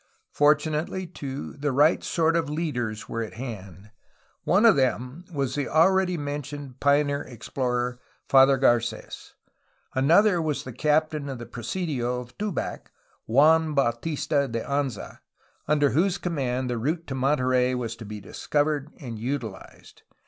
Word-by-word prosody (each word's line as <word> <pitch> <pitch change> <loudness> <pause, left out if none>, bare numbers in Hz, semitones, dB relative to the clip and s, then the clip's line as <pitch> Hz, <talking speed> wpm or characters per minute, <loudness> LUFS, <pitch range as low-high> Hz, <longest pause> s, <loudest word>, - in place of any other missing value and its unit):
Fortunately, 155 +4 +1
too, 140 -5 -6
the 145 0 -2
right 145 +5 +3
sort 165 -1 +1
of 165 -3 0
leaders 125 -9 -3
were 115 - -3
at 110 - -6
hand. 105 -5 -8 0.5
One 200 +5 +4
of 225 - +7
them 130 +4 -1
was 135 -5 -2
the 145 -1 -2
already 180 +3 +3
mentioned 145 -2 -6
pioneer 145 0 +2
explorer. 125 0 -3 0.3
Father 135 0 +6
Carets. 120 -3 0 0.6
Another 170 +7 +4
was 155 -3 -2
the 130 - -8
captain 150 +1 +1
of 135 - -5
the 120 - -8
presidio 125 0 -3
of 120 0 -11
Tubac, 210 -3 -3 0.4
Juan 155 +5 +4
Bautista 140 +3 0
de 115 -2 -3
Anza, 140 -6 -3 0.5
under 145 -2 +3
whose 180 +6 +2
command 130 -8 -2
the 120 -2 -2
route 160 +7 -1
to 135 - -5
Monterey 130 -2 +2
was 120 -2 -3
to 115 - -9
be 105 0 -7
discovered 145 - -1
and 120 -7 -7
utilized. 115 -5 -6
140 Hz, 140 wpm, -26 LUFS, 125-155 Hz, 0.6 s, of